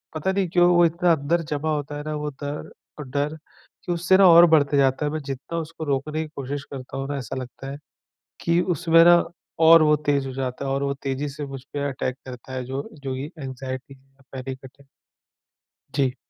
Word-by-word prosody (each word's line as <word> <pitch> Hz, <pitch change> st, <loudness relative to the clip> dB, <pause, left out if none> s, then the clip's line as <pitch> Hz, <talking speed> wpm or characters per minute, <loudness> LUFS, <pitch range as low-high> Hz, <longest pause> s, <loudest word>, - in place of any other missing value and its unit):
पता 155 Hz, +5 st, 0 dB
नहीं 190 Hz, -1 st, 0 dB
क्यों, 175 Hz, 0 st, +4 dB
वो 175 Hz, 0 st, +6 dB
इतना 170 Hz, +1 st, +2 dB
अंदर 160 Hz, +3 st, 0 dB
जमा 150 Hz, +2 st, -1 dB
होता 145 Hz, 0 st, -4 dB
है 150 Hz, -, -6 dB
ना 155 Hz, -, -3 dB
वो 150 Hz, 0 st, -3 dB
दर 145 Hz, +1 st, -5 dB, 0.4 s
डर 145 Hz, +3 st, -1 dB, 0.5 s
कि 175 Hz, -, -2 dB
उससे 180 Hz, +2 st, +3 dB
ना 195 Hz, -, +7 dB
और 170 Hz, +1 st, +9 dB
बढ़ते 150 Hz, -4 st, +3 dB
जाता 135 Hz, +2 st, +2 dB
है। 145 Hz, -, -1 dB
मैं 155 Hz, -, -2 dB
जितना 140 Hz, +4 st, -5 dB
उसको 160 Hz, 0 st, -7 dB
रोकने 145 Hz, +3 st, -1 dB
की 155 Hz, -, -9 dB
कोशिश 140 Hz, +1 st, -4 dB
करता 135 Hz, -1 st, -7 dB
हूँ 135 Hz, -, -3 dB
ना 145 Hz, -, -2 dB
ऐसा 135 Hz, 0 st, -5 dB
लगता 130 Hz, +1 st, -7 dB
है, 140 Hz, -, -6 dB, 0.6 s
कि 170 Hz, +1 st, +2 dB
उसमें 165 Hz, -1 st, +4 dB
ना 175 Hz, 0 st, +7 dB, 0.4 s
और 165 Hz, 0 st, +8 dB
वो 150 Hz, -1 st, +5 dB
तेज़ 140 Hz, -2 st, +2 dB
हो 135 Hz, -, -5 dB
जाता 130 Hz, 0 st, -3 dB
है -, -, -2 dB
और 140 Hz, -, -1 dB
वो 140 Hz, 0 st, 0 dB
तेज़ी 135 Hz, +1 st, -2 dB
से 145 Hz, +1 st, -6 dB
मुझपे 140 Hz, +1 st, -5 dB
अटैक 130 Hz, -1 st, -3 dB
करता 125 Hz, 0 st, -9 dB
है 130 Hz, -1 st, -3 dB
जो 135 Hz, +3 st, -5 dB, 0.2 s
जो 130 Hz, -, -2 dB
ये 140 Hz, +4 st, -5 dB
एंग्जयटी 130 Hz, -1 st, -6 dB
या 135 Hz, 0 st, -28 dB
पैनिक 130 Hz, 0 st, -7 dB
अटैक। 135 Hz, +1 st, -15 dB, 1.1 s
जी। 135 Hz, -3 st, +1 dB
145 Hz, 210 wpm, -24 LUFS, 135-160 Hz, 1.1 s, और